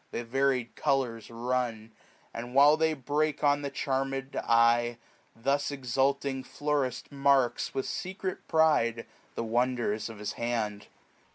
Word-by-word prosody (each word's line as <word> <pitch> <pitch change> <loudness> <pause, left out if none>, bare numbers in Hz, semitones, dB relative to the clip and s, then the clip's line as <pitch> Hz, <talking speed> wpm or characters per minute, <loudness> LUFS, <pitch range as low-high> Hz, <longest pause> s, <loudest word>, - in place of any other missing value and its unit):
The 120 - -4
varied 130 0 0
coloias 125 -5 0
run; 115 -2 -2 0.4
and 120 +2 -7
while 145 +2 +7
they 160 0 +1
break 145 +3 -1
On 145 0 +3
the 140 - -3
charm'd 135 0 -2
eye, 115 0 +3 0.4
th' 140 +4 0
exulting 135 0 0
florist 145 -4 -2
marks, 140 -3 +2
540 - - -11
With 135 - 0
secret 190 0 -5
pride, 150 -8 +2 0.3
the - - -2
wonders 120 -2 0
of 115 - -9
his 105 0 -4
hand. 110 -3 -3
130 Hz, 130 wpm, -29 LUFS, 115-140 Hz, 0.4 s, while